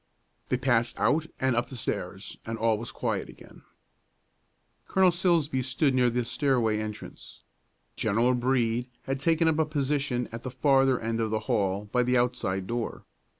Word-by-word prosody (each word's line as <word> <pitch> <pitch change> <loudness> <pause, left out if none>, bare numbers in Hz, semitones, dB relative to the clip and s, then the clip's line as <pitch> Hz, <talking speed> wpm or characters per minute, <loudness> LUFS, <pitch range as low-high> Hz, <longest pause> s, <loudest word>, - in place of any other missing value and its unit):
They 125 - +1
passed 120 -2 +1
out 155 +2 +2
and 130 -2 +1
up 120 - 0
the 130 - -8
stairs, - - -4
and 115 0 -4
all 110 -1 +1
was 115 - -6
again - - -12
quiet. - - -2 1.5
Colonel 190 -1 +4
Silsbee 170 -6 +1
stood 130 +2 +1
near 125 -1 +3
the 120 0 -1
stairway 115 -5 +1
entrance. 110 -1 -8 0.5
General 115 +5 +2
Brede 125 -1 0
had 135 0 -3
taken 165 +3 +2
up 160 -1 +2
a 160 - +3
position 140 -4 -1
at 115 0 -6
the 130 - -5
farther 135 0 +3
end 115 0 -2
of 110 - 0
the 110 0 -1
hall 100 -1 0
by 125 - +3
the 125 +1 +2
outside 120 -6 0
door. 120 +3 -4
125 Hz, 165 wpm, -27 LUFS, 115-135 Hz, 1.5 s, Colonel